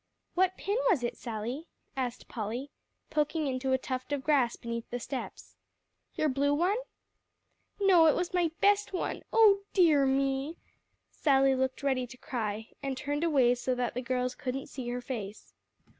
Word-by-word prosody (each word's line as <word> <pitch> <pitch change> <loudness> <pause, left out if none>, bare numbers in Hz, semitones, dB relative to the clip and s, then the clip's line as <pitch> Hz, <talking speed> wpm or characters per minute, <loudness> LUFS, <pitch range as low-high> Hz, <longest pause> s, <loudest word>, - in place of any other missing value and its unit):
"What 370 +1 +2
pin 405 +3 -1
was 320 - +2
it, 240 - -2
Sally?" 240 +7 -5 0.3
asked 250 -2 -3
Polly, 235 +5 -4 0.4
poking 300 +1 0
into 265 -1 -1
a 260 - +4
tuft 255 +1 -5
of 285 -2 -1
grass 270 -6 +3
beneath 235 0 -5
the 245 - -3
steps, 260 +2 -7 0.6
"your 310 - +1
blue 285 +1 +2
one?" 360 +7 +2 1.0
"No; 365 -5 +6
it 305 - +5
was 355 0 -2
my 350 -2 +2
best 405 0 +3
one 365 - -2
oh 425 -3 +6
dear 310 -7 +5
me!" 270 +4 0 0.5
Sally 270 -2 +3
looked 260 +1 -1
ready 260 -3 +1
to 255 +2 -12
cry, 220 -4 -4
and 275 -2 -3
turned 290 +3 -2
away 270 -7 +4
so 250 +1 -1
that 245 -1 -1
the 250 - -3
girls 255 0 -1
couldn't 265 +1 -4
see 255 -3 -5
her 245 +1 -3
face. 220 -5 -6
270 Hz, 165 wpm, -30 LUFS, 250-310 Hz, 1.0 s, No